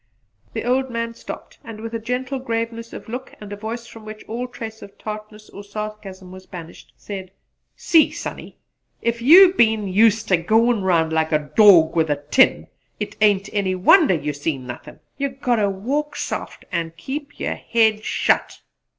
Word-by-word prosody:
The 225 - -3
old 260 +2 +1
man 230 -1 -3
stopped - - -10
and 225 -2 -9
with 230 +1 -7
a 230 - -2
gentle 255 +4 -3
graveness 230 -1 -4
of - - -9
look 250 +3 -7
and 205 -1 -8
a - - -4
voice 225 +3 -6
from 225 -1 -13
which 215 0 -9
all 240 +3 -4
trace 225 -3 -8
of 200 - -13
tartness 215 0 -8
or 200 - -10
sarcasm 200 -3 -8
was 185 0 -12
banished, 170 -2 -11
said, 190 -2 -7 0.5
"See, 325 -2 +4
Sonny! - - -8 0.5
If 235 0 -1
you 355 +8 +8
been 220 - +2
useter 210 0 +3
goin' 220 +6 +2
round 165 -4 +1
like 160 0 +1
a 150 -2 -1
dawg 185 -8 +7
with 160 -2 +2
a 145 0 -1
tin 265 - +4 0.3
it - - -5
ain't 205 -1 +3
any 190 -2 0
wonder 220 - +5
you 150 -2 -3
seen 145 -2 -3
nothin'. 120 -1 -10 0.2
You 280 0 0
got 255 -2 -1
ter 205 -2 +2
walk 280 +10 -3
soft - - -5
an' 165 -2 -2
keep 280 - -7
yer - - -1
head 220 -2 +1
shut!" - - 0
215 Hz, 175 wpm, -21 LUFS, 185-235 Hz, 0.5 s, you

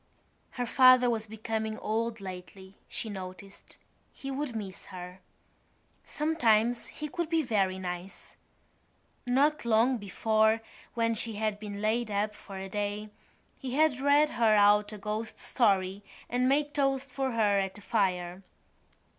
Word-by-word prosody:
Her 245 - 0
father 255 0 +6
was 220 -1 -2
becoming 220 0 -3
old 225 +1 -2
lately, 190 0 -9
she - - -4
noticed; 190 -1 -9 0.3
he 275 - -7
would 270 -3 -3
miss 195 -4 -6
her. 180 -1 -9 0.8
Sometimes 245 -7 +1
he 305 - -6
could 340 0 -3
be 325 -1 +2
very 195 -7 +1
nice. 180 0 -7 0.9
Not 285 +5 +2
long 235 +3 +3
before, 220 +2 +2 0.3
when 230 -1 +1
she 225 0 -2
had 210 0 -2
been 205 -1 -6
laid 225 +1 +1
up 210 +1 -1
for 195 -2 -10
a 190 0 -5
day, 205 +1 -3 0.5
he 260 -2 -4
had 300 -4 +3
read 285 +2 +4
her 225 -2 +3
out 205 0 +5
a 215 - -7
ghost 215 +2 -4
story 195 -4 +1 0.3
and 250 +1 +1
made 290 +1 +1
toast 275 -2 0
for 265 -1 -2
her 210 -3 +3
at 195 -1 -2
the 205 - -10
fire. 185 -4 -1
220 Hz, 145 wpm, -29 LUFS, 200-250 Hz, 0.9 s, father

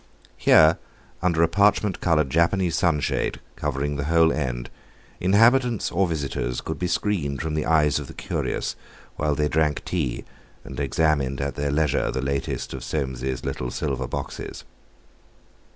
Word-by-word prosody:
Here, 80 0 +5 0.4
under 85 -2 +2
a - - +5
parchment 100 +2 +2
coloured 75 -6 +2
Japanese 85 +2 +2
sunshade 85 -5 0 0.2
covering 70 +1 -2
the 70 - -2
whole 80 +1 +4
end, 60 -5 -3 0.5
inhabitants 115 +5 +3
or 95 +2 +2
visitors 70 -6 -2
could - - -5
be 90 - 0
screened 85 -6 -1
from 80 -2 -3
the 75 0 -1
eyes 75 -3 +3
of - - -7
the - - -11
curious - - -3 0.4
while 75 -1 0
they 75 0 +1
drank 75 -1 0
tea 75 -9 -2 0.4
and 65 -1 -8
examined 70 -1 +1
at 70 0 -2
their 70 0 -2
leisure 75 -1 +1
the - - -2
latest 70 +1 -2
of 65 -2 -6
Soames's 65 -3 -3
little 60 - -3
silver 65 0 -2
boxes. - - -6
75 Hz, 150 wpm, -24 LUFS, 70-85 Hz, 0.5 s, Here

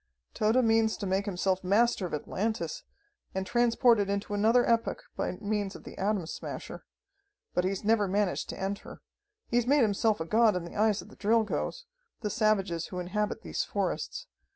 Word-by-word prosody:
"Tode 230 +4 +3
means 225 0 +3
to 205 - -4
make 195 +2 0
himself 190 0 0
master 205 +1 +2
of - - -10
Atlantis, 220 - -3 0.5
and 190 0 -1
transport 240 0 +4
it 200 -1 0
into 200 +1 -2
another 225 +4 +4
epoch 230 -1 +1
by - - -2
means 205 0 -2
of - - -10
the - - -10
Atom 200 -2 0
Smasher. - - -7 0.7
But 180 - +1
he's 190 +1 -2
never 210 -1 +3
managed 200 0 0
to - - -6
enter. 195 +1 -5 0.4
He's 240 0 +1
made 285 0 +5
himself 215 0 +2
a 160 - -2
god 220 +3 +4
in 180 -1 -2
the 170 - -10
eyes 210 -1 +2
of - - -15
the - - -15
Drilgoes, 225 - 0 0.4
the 210 -2 -2
savages 195 -6 +1
who 180 - -7
inhabit 205 +4 -2
these - - -2
forests. 485 +1 -3
210 Hz, 175 wpm, -29 LUFS, 195-225 Hz, 0.7 s, made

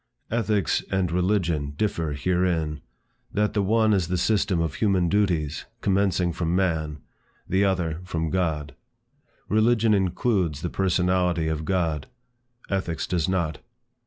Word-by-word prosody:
Ethics 110 -5 +1
and 95 -3 0
religion 85 -6 0
differ 85 -7 -1
herein; 80 -1 0 0.5
that 105 0 0
the 105 - +1
one 110 +2 +3
is 95 -4 +1
the 90 +1 -1
system 100 -1 +1
of 80 -3 -1
human 95 -5 +2
duties 85 -7 0 0.2
commencing 95 -3 +1
from 85 +1 -1
man; 80 -5 0 0.5
the 95 +2 +2
other, 90 -5 0
from 80 -3 -2
God. 80 -6 -1 0.7
Religion 110 +1 +3
includes 95 - +1
the 85 - -2
personality 90 -3 +1
of 80 0 -2
God; 80 -5 0 0.6
Ethics 95 -4 -2
does 85 -2 0
not. 85 -5 -1
90 Hz, 130 wpm, -25 LUFS, 80-100 Hz, 0.7 s, one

